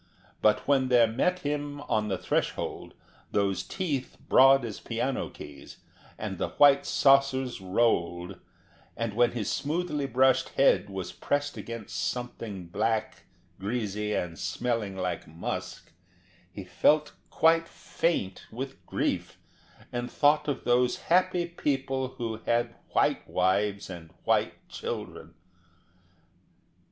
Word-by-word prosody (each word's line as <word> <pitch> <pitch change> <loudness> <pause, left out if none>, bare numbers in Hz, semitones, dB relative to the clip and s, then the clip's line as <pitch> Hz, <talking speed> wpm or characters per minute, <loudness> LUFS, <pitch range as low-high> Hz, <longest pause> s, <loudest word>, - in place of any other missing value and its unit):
But 105 - +3
when 135 -2 +3
there 120 -2 +6
met 180 +12 0
him 145 -1 -3
on 110 -7 0
the 95 -2 -1
threshold - - -2 0.4
those 100 -2 +1
teeth 150 -9 -3
broad 135 0 +6
as 110 -3 -6
piano - - -2
keys, 70 -1 -11 0.4
and - - -5
the - - -1
white 140 -1 +5
saucers 135 -4 +3
rolled, 90 -3 0 0.6
and 115 -2 -2
when 120 +2 +3
his 115 -5 -2
smoothly 150 -2 -1
brushed 130 +1 +3
head 135 -6 +4
was 95 -2 -5
pressed 145 0 -1
against 115 -3 -7
something 115 -6 -4
black, 110 +5 -2 0.3
greasy, 105 0 -2
and 85 -2 -3
smelling 115 -6 -2
like 90 -1 -3
musk, 80 +2 -6 0.6
he 100 - -7
felt 150 +11 +2 0.2
quite 165 +1 +3
faint 100 - -2
with 135 +4 -6
grief, - - -2 0.5
and 120 0 -3
thought 150 +1 +3
of 140 -3 -2
those 125 0 +2 0.2
happy 185 -1 +3
people 135 -5 -2
who 115 -2 -3
had 120 0 +1 0.2
white - - +2
wives 100 +2 +1
and 85 -3 -9
white - - 0
children. - - -6
120 Hz, 120 wpm, -28 LUFS, 100-140 Hz, 0.6 s, there